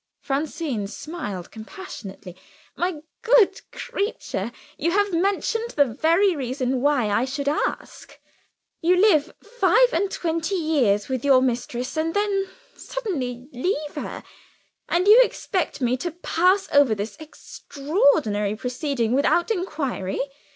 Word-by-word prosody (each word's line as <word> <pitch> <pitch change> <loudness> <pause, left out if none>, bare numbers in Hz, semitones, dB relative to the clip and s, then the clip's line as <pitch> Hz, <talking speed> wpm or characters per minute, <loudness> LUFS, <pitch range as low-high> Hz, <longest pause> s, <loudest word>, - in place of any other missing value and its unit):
Francine 275 - -2
smiled 210 - -6
compassionately. 215 - -9 0.4
"My 350 -4 -2 0.2
good 470 -3 +4
creature, 400 - -3 0.2
you 330 - 0
have 405 +1 +1
mentioned 400 +6 0
the 285 - +5
very 330 - +2
reason 255 -1 -2
why 280 -5 +2
I 215 +4 +2
should 280 +2 -3
ask. 295 - -3 0.6
You 350 +2 +4
live 350 -6 +4
five - - +3
and 400 - +1
twenty 335 +1 -2
years 275 - +1
with 260 -2 -3
your 275 -2 +6
mistress 245 -1 -2
and 325 +2 -1
then 400 -2 0 0.3
suddenly 265 - -4
leave 295 +3 -2
her - - -6 0.7
and 355 +3 +1
you 445 +4 +9
expect 375 - -1
me 250 0 +2
to 345 +7 -3
pass 360 +3 +1
over 285 -6 +5
this 205 +2 -5
extraordinary 280 - 0
proceeding 250 0 -2
without 345 - +2
inquiry. 300 - -2
300 Hz, 125 wpm, -23 LUFS, 250-370 Hz, 0.7 s, you